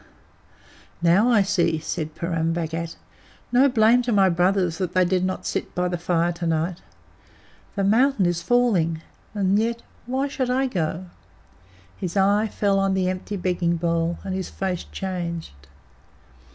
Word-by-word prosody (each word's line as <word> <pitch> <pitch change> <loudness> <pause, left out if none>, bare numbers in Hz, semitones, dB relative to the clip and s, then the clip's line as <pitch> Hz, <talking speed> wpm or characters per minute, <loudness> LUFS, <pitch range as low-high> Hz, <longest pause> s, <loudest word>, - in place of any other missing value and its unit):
"Now 190 +8 +4
I 220 -5 +5
see," 185 -5 +1
said 155 0 -4
Purun 165 -1 -1
Bhagat. 165 0 -3 0.6
"No 260 +3 +5
blame 235 0 +4
to 245 0 -2
my 195 -3 +4
brothers 180 -1 +1
that 180 -2 -2
they 185 0 +4
did 180 0 +1
not 185 0 -2
sit - - -3
by 180 0 +1
the 175 0 -2
fire 175 0 +1
to 170 0 -4
night. 165 +2 -1 0.9
The 200 - 0
mountain 225 +1 +3
is 175 -1 0
falling. 175 -8 +1 0.3
And 200 0 +2
yet 235 +1 -1 0.2
why 265 +3 0
should 265 -3 -2
I 260 +2 +1
go?" 180 -6 -2 0.9
His 180 0 -4
eye 200 +3 +3
fell 200 -1 +1
on 195 -1 +1
the 185 -1 +1
empty 185 +2 -4
begging 175 -2 0
bowl, 170 0 0
and 190 - -4
his 190 -1 -3
face 185 -2 -3
changed. 170 - -5
185 Hz, 155 wpm, -23 LUFS, 170-205 Hz, 0.9 s, I